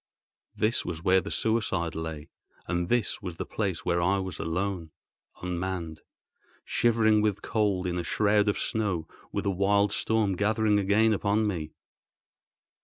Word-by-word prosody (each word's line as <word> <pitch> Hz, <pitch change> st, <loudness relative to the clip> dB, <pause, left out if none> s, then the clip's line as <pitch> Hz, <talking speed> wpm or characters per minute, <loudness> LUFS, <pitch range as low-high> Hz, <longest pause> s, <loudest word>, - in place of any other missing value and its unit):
This 110 Hz, +2 st, +1 dB
was 85 Hz, -1 st, -5 dB
where 95 Hz, +1 st, +4 dB
the 100 Hz, -, -7 dB
suicide 100 Hz, -8 st, 0 dB
lay; 80 Hz, -1 st, -6 dB, 0.4 s
and 85 Hz, 0 st, -1 dB
this 120 Hz, -2 st, +1 dB
was 90 Hz, -4 st, -5 dB
the -, -, -4 dB
place 95 Hz, -6 st, -3 dB
where 85 Hz, 0 st, +1 dB
I 95 Hz, +3 st, +2 dB
was 95 Hz, -1 st, -4 dB
alone—unmanned, 90 Hz, -1 st, -5 dB, 0.6 s
shivering 110 Hz, -2 st, +3 dB
with 105 Hz, -2 st, 0 dB
cold 105 Hz, -5 st, 0 dB
in 90 Hz, 0 st, -1 dB
a -, -, -2 dB
shroud 105 Hz, +4 st, +2 dB
of 100 Hz, -, 0 dB
snow 95 Hz, -8 st, -1 dB, 0.2 s
with -, -, -3 dB
a 100 Hz, -, +2 dB
wild 100 Hz, +2 st, +2 dB
storm 110 Hz, -3 st, +1 dB
gathering 105 Hz, +1 st, +2 dB
again 105 Hz, +3 st, +3 dB
upon 105 Hz, +1 st, +1 dB
me! 80 Hz, -7 st, -3 dB
100 Hz, 145 wpm, -28 LUFS, 85-105 Hz, 0.6 s, where